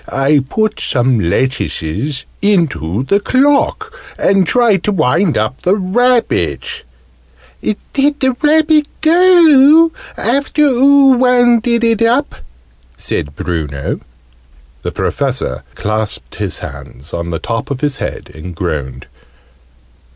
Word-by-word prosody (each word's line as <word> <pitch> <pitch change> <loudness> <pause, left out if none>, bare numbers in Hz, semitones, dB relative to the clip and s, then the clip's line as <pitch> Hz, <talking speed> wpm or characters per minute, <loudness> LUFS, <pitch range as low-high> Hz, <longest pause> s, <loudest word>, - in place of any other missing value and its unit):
I 135 +1 +1
put 215 -1 -1
some 120 -2 0
lettuces 130 - -2 0.2
into 155 - 0
the 200 +9 +1
clock, 285 - +1 0.2
and 195 -2 +2
tried 230 -7 +2
to 210 - +1
wind 170 0 +1
up 110 +5 -2
the 185 +3 +2
rabbit!" 225 - 0 0.8
"Did 285 +7 -2
the 260 -2 +1
rabbit 305 0 +3
go, 325 -2 +5 0.3
after 280 +4 0
oo 275 0 +4
wounded 240 -2 +2
it 230 -1 +1
up?" 245 +5 +1 0.6
said 70 -1 -4
Bruno. 75 -6 -4 0.8
The - - -4
Professor 65 +1 -2
clasped 110 0 -3
his - - -3
hands 70 +6 -10
on 85 0 -4
the 85 - -3
top 115 +6 -4
of 140 -2 -4
his 145 -2 -1
head, - - -6
and 85 +3 -9
groaned. 70 -7 -4
200 Hz, 115 wpm, -14 LUFS, -, 0.8 s, go